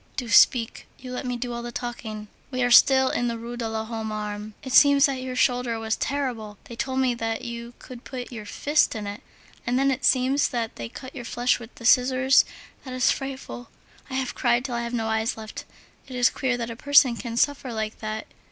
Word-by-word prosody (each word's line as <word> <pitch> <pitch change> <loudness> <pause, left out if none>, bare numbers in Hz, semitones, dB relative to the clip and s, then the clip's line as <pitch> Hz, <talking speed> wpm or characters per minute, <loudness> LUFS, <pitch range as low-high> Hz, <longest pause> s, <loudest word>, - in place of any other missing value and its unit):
Do 245 -3 -3
speak! 230 +2 +4
You 255 -1 -9
let 250 +1 -4
me 245 -1 -2
do 245 0 -4
all 235 - -4
the 240 0 -6
talking. 225 -3 -6 0.2
We 255 -2 -1
are 245 - +1
still 265 +1 +6
in 240 - 0
the 230 -1 -2
Rue 235 +1 -7
de 235 -2 -3
l'Homme 220 0 -4
Armé. 210 0 -5
It 260 -2 -5
seems 285 0 +7
that 270 -3 -1
your 255 0 -5
shoulder 245 -2 +1
was 220 0 -1
terrible. 245 -7 -3
They 235 - -10
told 260 +2 -3
me 260 -2 +2
that 225 -1 -3
you 235 0 -7
could 250 -2 -11
put 255 -1 -7
your 215 -3 -8
fist 295 +3 +1
in 215 -2 -4
it. 205 +1 -6 0.5
And 245 +1 +1
then, 275 +1 +3
it 265 +1 -3
seems 265 +2 +3
that 230 -2 -3
they 115 -1 -6
cut 260 - -10
your 250 - -7
flesh 245 +2 +1
with 230 0 -12
the 230 - -10
scissors. 255 +2 +5 0.4
That 255 -2 -7
is 255 - +3
frightful. 270 -3 -6 0.4
I 260 - -5
have 260 -1 -2
cried 240 0 +1
till 255 - -4
I 235 - -1
have 235 0 -5
no 225 -1 -1
eyes 220 +1 0
left. 220 -1 -8 0.4
It 260 - -8
is 245 -1 +4
queer 255 -2 -1
that 235 -1 -4
a - - -6
person 275 -1 +5
can 230 0 -6
suffer 280 -1 +1
like 220 -1 -4
that. 215 0 -4
245 Hz, 225 wpm, -25 LUFS, 225-260 Hz, 0.5 s, seems